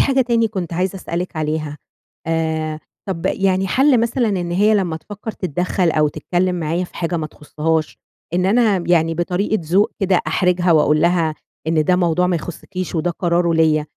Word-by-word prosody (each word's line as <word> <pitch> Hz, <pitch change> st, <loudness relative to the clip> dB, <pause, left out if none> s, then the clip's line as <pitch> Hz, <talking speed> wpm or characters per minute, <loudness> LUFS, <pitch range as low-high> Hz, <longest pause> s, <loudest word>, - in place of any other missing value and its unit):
حاجة 270 Hz, -1 st, +3 dB
تاني 230 Hz, -2 st, +2 dB
كنت 180 Hz, -6 st, -4 dB
عايزة 185 Hz, +3 st, -1 dB
أسألِك 180 Hz, -1 st, -4 dB
عليها. 155 Hz, -1 st, -2 dB, 0.5 s
آآ 160 Hz, -1 st, -1 dB, 0.3 s
طَب 165 Hz, -3 st, -2 dB
يعني 190 Hz, 0 st, +1 dB
حَل 265 Hz, 0 st, +4 dB
مثلًا 235 Hz, 0 st, +1 dB
إن 180 Hz, -4 st, -2 dB
هي 205 Hz, +5 st, +3 dB
لمّا 175 Hz, -6 st, 0 dB
تفكّر 205 Hz, +6 st, -7 dB
تتدخل 180 Hz, 0 st, -1 dB
أو 155 Hz, -1 st, +2 dB
تتكلم 180 Hz, +4 st, -1 dB
معايا 165 Hz, +3 st, -1 dB
في -, -, -13 dB
حاجة 170 Hz, 0 st, -1 dB
ما 155 Hz, -2 st, -2 dB
تخصهاش، 155 Hz, +1 st, -2 dB, 0.4 s
إن 180 Hz, +1 st, +2 dB
أنا 215 Hz, -2 st, +3 dB
م 170 Hz, -, -6 dB
يعني 165 Hz, -2 st, +2 dB
بطريقة 180 Hz, +5 st, 0 dB
ذوق 180 Hz, +6 st, +2 dB
كده 190 Hz, -2 st, +3 dB
أحرِجها 180 Hz, +1 st, +2 dB
وأقول 150 Hz, -1 st, +3 dB
لها 170 Hz, -2 st, +2 dB, 0.3 s
إن 160 Hz, -1 st, +2 dB
ده 180 Hz, +2 st, +3 dB
موضوع 180 Hz, 0 st, +2 dB
ما 180 Hz, -1 st, +1 dB
يخصكيش 180 Hz, +3 st, -6 dB
وده 170 Hz, +1 st, 0 dB
قراره 170 Hz, -1 st, +1 dB
ليَّ، 155 Hz, -2 st, +3 dB
175 Hz, 175 wpm, -19 LUFS, 160-190 Hz, 0.5 s, حَل